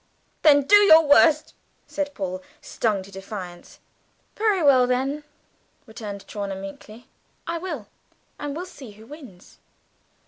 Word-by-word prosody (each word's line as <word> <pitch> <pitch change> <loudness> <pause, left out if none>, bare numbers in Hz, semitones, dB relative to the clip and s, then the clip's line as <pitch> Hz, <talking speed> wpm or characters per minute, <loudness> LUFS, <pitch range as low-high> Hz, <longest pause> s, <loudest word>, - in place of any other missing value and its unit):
"Then 285 -2 +5
do 410 +9 +6
your 325 -6 +7
worst!" 305 +2 +4 0.3
said 290 -1 -4
Paul, 185 -1 -4 0.2
stung 210 -4 -2
to 195 - -15
defiance. 190 -2 -9 0.6
"Very 420 -5 +1
well, 260 -3 +5
then," 270 +4 -1 0.6
returned 215 -4 -8
Chawner 200 -2 -5
meekly, 210 +4 -11 0.4
"I 335 0 -3
will 320 - -6 0.5
and 290 -1 -5
we'll 350 +3 -5
see 280 -9 -12
who 215 +2 -16
wins!" 245 - -14
260 Hz, 130 wpm, -23 LUFS, 200-305 Hz, 0.6 s, your